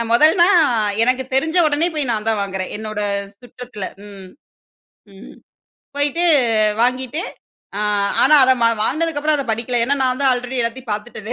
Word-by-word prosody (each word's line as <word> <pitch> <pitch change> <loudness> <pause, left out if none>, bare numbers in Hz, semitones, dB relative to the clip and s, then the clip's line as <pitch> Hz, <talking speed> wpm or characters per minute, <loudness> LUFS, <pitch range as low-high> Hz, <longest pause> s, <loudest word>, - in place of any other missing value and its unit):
அ - - +1
மொதல்னா 320 +8 +5 0.6
எனக்கு 255 +2 +1
தெரிஞ்ச 320 +6 0
உடனே 305 +3 +1
போய் 290 -5 -2
நான் 215 0 -4
தான் 220 -1 0
வாங்குறேன் 190 -1 -5
என்னோட 215 0 -6 0.4
சுற்றத்தில. 245 -4 -9 0.2
ம். 200 -2 -12 0.9
ம். 195 +3 -14 0.6
போயிட்டு 290 +4 0 0.6
வாங்கிட்டு, 255 +5 -1 0.6
ஆ - - -2 0.4
ஆனா 305 - +5
அத 260 - +4
ம - - +5 0.2
வாங்கினதுக்கப்புற 310 +2 -1
அத 275 - -3
படிக்கல 235 +2 -2
ஏனா 280 +4 0
நான் 255 +1 -1
தான் 270 - +4
ஆல்ரெடி 250 +1 -4
எல்லாத்தையும் 235 0 -4
பார்த்துட்டேனே.. 215 +1 -6
255 Hz, 150 wpm, -18 LUFS, 220-290 Hz, 0.9 s, மொதல்னா